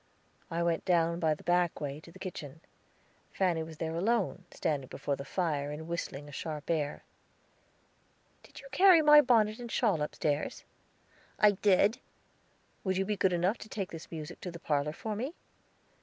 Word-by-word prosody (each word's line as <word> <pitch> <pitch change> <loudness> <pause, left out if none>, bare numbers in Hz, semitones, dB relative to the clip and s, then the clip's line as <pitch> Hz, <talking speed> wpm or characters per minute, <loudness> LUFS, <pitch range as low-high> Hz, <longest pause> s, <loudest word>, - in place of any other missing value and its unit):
I 170 0 -1
went 170 -1 0
down 170 -1 +2
by 160 -2 +2
the - - -16
back 175 -1 +2
way, 145 -1 -4
to 170 - -14
the 185 - -14
kitchen; 165 -5 -7 0.7
Fanny 180 -4 +1
was 160 -1 -8
there 160 0 -3
alone, 195 -1 0
standing 140 -4 -2
before 140 +2 -3
the 140 - -7
fire, 150 -4 -1
and 155 +2 -6
whistling 150 -4 -4
a - - -10
sharp 150 +2 -4
air. 150 -3 -1 1.4
"Did - - -13
you 275 - -12
carry 360 +2 +7
my 300 0 +9
bonnet 225 -4 +3
and 240 -2 -7
shawl 205 - +2
upstairs?" 150 0 -2 0.7
"I 210 - +6
did." 205 +4 +3 0.8
"Will 190 - +1
you 195 - +1
be 210 - -1
good 190 -1 +2
enough 180 +5 +1
to 215 - -10
take 195 -4 -4
this 165 -1 -9
music 155 -2 -7
to 180 - -5
the 170 - -8
parlor 150 -2 -1
for 215 +5 -4
me?" 260 - -4
170 Hz, 175 wpm, -31 LUFS, 155-205 Hz, 1.4 s, my